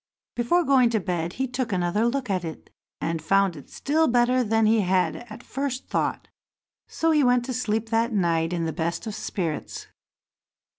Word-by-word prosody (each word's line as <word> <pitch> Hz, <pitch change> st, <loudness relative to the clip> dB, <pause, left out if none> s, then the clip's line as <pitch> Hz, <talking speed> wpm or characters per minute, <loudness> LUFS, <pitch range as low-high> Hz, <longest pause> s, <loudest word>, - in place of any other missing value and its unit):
Before 295 Hz, +10 st, +2 dB
going 265 Hz, -5 st, +4 dB
to 225 Hz, -2 st, +1 dB
bed 175 Hz, -2 st, -2 dB
he 265 Hz, +1 st, -2 dB
took 250 Hz, -2 st, -3 dB
another 185 Hz, +4 st, +1 dB
look 255 Hz, +1 st, -1 dB
at 185 Hz, -3 st, -1 dB
it, 160 Hz, -2 st, -8 dB, 0.3 s
and 165 Hz, -1 st, -2 dB
found 195 Hz, +2 st, +2 dB
it 145 Hz, -, -12 dB
still 315 Hz, +3 st, +1 dB
better 245 Hz, +1 st, +3 dB
than 225 Hz, 0 st, +2 dB
he 220 Hz, +1 st, +4 dB
had 185 Hz, -1 st, +1 dB
at 235 Hz, -, -10 dB
first 270 Hz, -1 st, -4 dB
thought, -, -, -1 dB, 0.6 s
so 325 Hz, 0 st, 0 dB
he 300 Hz, -2 st, +4 dB
went 245 Hz, -1 st, +3 dB
to 260 Hz, -, -3 dB
sleep 225 Hz, -2 st, -1 dB
that 230 Hz, +1 st, +1 dB
night 170 Hz, -5 st, +1 dB
in 170 Hz, -2 st, -1 dB
the 160 Hz, -, -2 dB
best 170 Hz, +7 st, -2 dB
of 215 Hz, -, -4 dB
spirits. 185 Hz, -6 st, -4 dB
225 Hz, 185 wpm, -25 LUFS, 180-250 Hz, 0.6 s, going